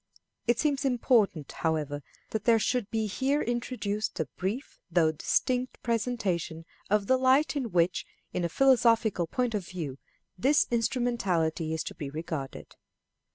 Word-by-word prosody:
It 240 0 +3
seems 285 0 +1
important, 230 - +2
however, 150 -3 -1 0.3
that 220 -1 -3
there 230 -2 +6
should 225 -1 0
be 220 -1 0
here 265 +8 0
introduced 235 -4 -2
a 160 - +1
brief 205 +9 -4
though 165 -2 +3
distinct 250 +10 0
presentation 200 -9 -1 0.2
of 210 0 +2
the 260 +5 +4
light 265 +4 +3
in 260 -5 -1
which, 175 0 +2 0.3
in 180 - -1
a 170 - 0
philosophical 230 -6 +3
point 245 +5 -1
of 200 -4 -2
view, 150 -7 -5 0.4
this 285 +7 +4
instrumentality 200 -10 0
is 160 0 -1
to - - -6
be 145 - -6
regarded. 155 -2 -6
215 Hz, 145 wpm, -29 LUFS, 165-250 Hz, 0.4 s, there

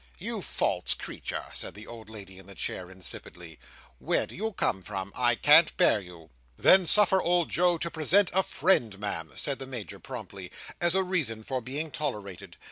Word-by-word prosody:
"You - - -4
false - - +1
creature!" - - -6
said - - -3
the 105 +1 -9
old 115 -2 -11
lady 95 -4 -11
in 95 - -14
the 100 - -8
chair, 90 0 -4
insipidly. 90 -3 -9 0.4
"Where - - 0
do - - -12
you 220 +5 -3
come 95 - -1
from? 95 0 -6
I 120 -1 +2
can't 150 +6 +5
bear - - +4
you." 85 -5 -14 0.3
"Then 185 -2 +5
suffer 190 -1 +6
old 175 -1 +1
Joe 175 0 +2
to 170 +1 -3
present 175 +5 +3
a 190 - +4
friend, 135 - +1
Ma'am," 85 -7 -5
said 140 -2 -2
the 135 - -7
Major, 110 -6 -7
promptly, 100 -7 -9 0.3
"as 175 +1 +2
a 190 - +3
reason 150 -13 -1
for 130 +2 -3
being 145 +6 -5
tolerated. 100 - -6
120 Hz, 185 wpm, -28 LUFS, -, 0.4 s, suffer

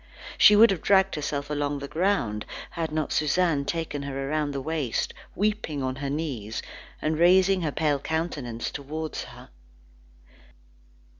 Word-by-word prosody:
She 210 - +8
would 220 +1 +7
have 185 - -2
dragged 195 -1 +4
herself 145 -1 -3
along 145 -1 -1
the 140 0 -6
ground, 155 - 0 0.2
had 165 -3 -3
not 155 -1 -2
Suzanne 155 -1 +2
taken 160 -2 -3
her 135 -1 -4
round 150 -1 0
the 140 - -3
waist, 145 -4 -2 0.2
weeping 205 -9 -1
on 130 0 -2
her 140 0 -3
knees, 135 -8 -3 0.4
and 155 0 0
raising 185 +2 +5
her 155 -3 -1
pale 150 -2 +1
countenance 145 -7 -3
towards 155 +2 -5
her. - - -13
150 Hz, 145 wpm, -26 LUFS, 140-170 Hz, 0.4 s, She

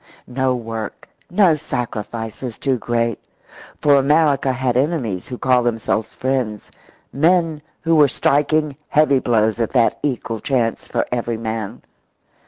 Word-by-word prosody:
No 130 0 0
work, 115 -3 -6 0.2
no 180 -2 +4
sacrifice 115 -6 -4
was 125 -4 -5
too 135 -4 0
great, 115 -1 -1 0.6
for 145 -1 +5
America 140 -1 +3
had 130 -1 -1
enemies 130 - -1
who 125 - -6
called 125 -2 +2
themselves 110 -1 -1
friends, 125 -5 -2 0.4
men 165 0 +2 0.2
who 165 0 +2
were 150 -2 +6
striking 150 +2 +1
heavy 150 -3 +4
blows 110 -2 +1
at 115 - 0
that 120 -3 +2
equal 120 -5 -2
chance 120 -3 -1
for - - -1
every 120 -1 -1
man. 110 0 -5
125 Hz, 135 wpm, -20 LUFS, 115-145 Hz, 0.6 s, were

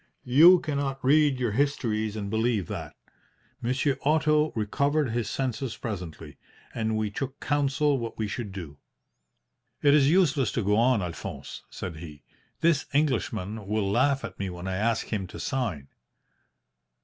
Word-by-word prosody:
You 165 +9 +7
cannot 140 -4 -2
read 145 -1 +4
your 120 -3 0
histories 110 -4 0
and 105 -2 -4
believe 110 -1 0
that. - - -6 0.7
Monsieur 130 +3 0
Otto 150 +1 +3
recovered 140 +5 0
his 120 -1 -2
senses 130 -2 -3
presently, 85 -8 -6 0.4
and 110 -1 -1
we 110 -1 -1
took 135 +5 -5
counsel 145 0 +1
what 115 -1 -5
we 110 - -1
should 105 0 -5
do. 85 -7 -8 1.1
"'It 145 -1 +6
is 145 -2 +5
useless 150 - +3
to 115 - -1
go 105 +1 +2
on, 115 -2 +3
Alphonse,' 85 -2 -7
said 90 -4 -6
he. 75 -2 -10 0.4
'This 165 -4 +2
Englishman 110 -8 -1
will 105 -1 0
laugh 135 +4 +2
at - - -9
me 100 -1 -2
when 90 +1 -7
I 95 0 -2
ask 115 +2 0
him 95 -3 -2
to - - -10
sign.' 100 - -2
120 Hz, 150 wpm, -27 LUFS, 105-140 Hz, 1.1 s, You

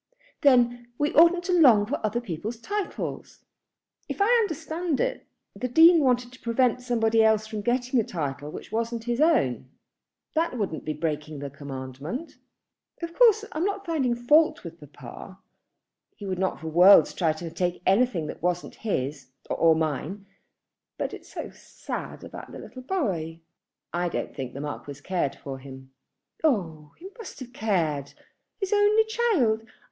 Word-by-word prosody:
"Then 245 -4 +4
we 295 +1 0
oughtn't 340 +2 +6
to 360 - -1
long 250 -12 +6
for 250 +4 -4
other 215 +2 0
people's 220 +1 -5
titles." 410 - -5 0.6
"If - - -5
I 400 - +4
understand 325 -4 -2
it, - - -2 0.3
the 235 +6 -3
Dean 325 +7 +7
wanted 250 -3 +1
to 255 - -15
prevent 245 +1 +1
somebody 225 -2 +2
else 220 -1 +3
from 215 -1 -5
getting 245 +2 +1
a - - +2
title 145 -6 -4
which - - -9
wasn't 230 +1 -2
his 240 +3 -1
own. 130 - +2 0.6
That 320 -5 0
wouldn't 195 -8 -3
be 155 - -1
breaking 150 0 -3
the 140 0 -6
commandment." 140 - -7 0.6
"Of 335 0 -4
course 440 -1 +5
I 310 - -4
am - - +1
not 400 +1 -2
finding 280 -8 0
fault 295 +7 +3
with 170 -1 -9
papa. 145 +8 -11 0.8
He 205 - -9
would 185 -2 -3
not 190 0 -1
for 160 - -7
worlds 180 +5 +7
try 165 -4 +1
to 165 +1 -7
take 175 +1 -2
anything 195 -4 +2
that - - -7
wasn't 175 +1 -1
his, 140 - -3 0.2
or 165 -1 +4
mine. 160 +5 -3 0.7
But - - -3
it's - - -11
so - - -6
sad - - -7
about - - -9
the - - -8
little 255 - -10
boy." 185 - -2 0.5
"I 175 0 0
don't - - -4
think 130 -3 -6
the 140 - -5
Marquis 145 -1 -6
cared 175 -7 -1
for 135 -1 -7
him." 130 0 -12 0.5
"Oh, 165 - 0
he 365 - -10
must 455 - -9
have 245 -1 -9
cared! 165 - -1 0.5
His 390 -1 -1
only 415 +1 +5
child! 415 - +1
220 Hz, 160 wpm, -26 LUFS, -, 0.8 s, Dean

